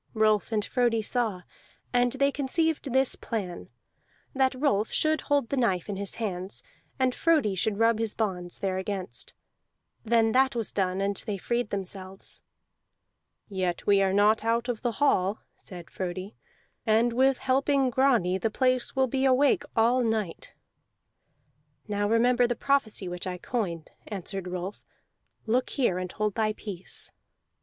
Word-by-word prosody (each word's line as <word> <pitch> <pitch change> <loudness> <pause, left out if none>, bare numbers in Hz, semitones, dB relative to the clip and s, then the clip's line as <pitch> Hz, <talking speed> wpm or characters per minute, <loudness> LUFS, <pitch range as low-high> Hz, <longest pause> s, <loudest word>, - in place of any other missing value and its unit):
Rolf 215 0 +2
and 210 -2 0
Frodi 235 -3 +1
saw; 215 -6 -1 0.5
and 245 0 +3
they 275 +1 +2
conceived 290 +1 0
this 265 +1 +3
plan, 195 -7 -5 0.6
that 265 -1 +2
Rolf 225 -7 +2
should 310 0 +1
hold 285 -5 +1
the 280 - -1
knife 195 -7 +1
in 200 - -2
his 200 0 -4
hands, 190 -4 -4 0.3
and 260 -1 +2
Frodi 305 -12 +2
should 200 +2 0
rub 225 0 +3
his 225 -2 0
bonds 180 -5 -3
thereagainst. 190 0 -3 0.7
Then 225 -1 +3
that 265 +1 +3
was 230 -3 -2
done, 190 -1 0
and 200 0 0
they 205 -2 -2
freed 235 +4 -1
themselves. 190 -1 -5 1.1
"Yet 185 -3 -2
we 200 -1 +4
are 190 -1 +2
not 210 +3 +3
out 230 +1 +1
of 240 -3 -3
the 240 -2 -1
hall," 205 -7 +2 0.2
said 175 -4 -11
Frodi, 185 +2 -5 0.5
"and 225 +2 +3
with 260 +2 +3
helping 270 0 +2
Grani 235 -9 +2
the 225 - 0
place 255 +3 +1
will 265 0 +3
be 265 +2 -1
awake 270 +2 +4
all 235 +3 +4
night." 220 -6 -2 1.3
"Now 205 -1 0
remember 240 +2 +4
the 240 - -1
prophecy 240 -8 0
which 175 +1 -5
I 180 -1 -3
coined," 180 -6 -3 0.2
answered 195 -2 -5
Rolf. 180 +2 -5 0.6
"Look 240 +3 +1
here 235 -10 +1
and 185 0 -4
hold 210 -1 -1
thy 215 0 0
peace." 195 -4 -7
220 Hz, 150 wpm, -27 LUFS, 195-255 Hz, 1.3 s, we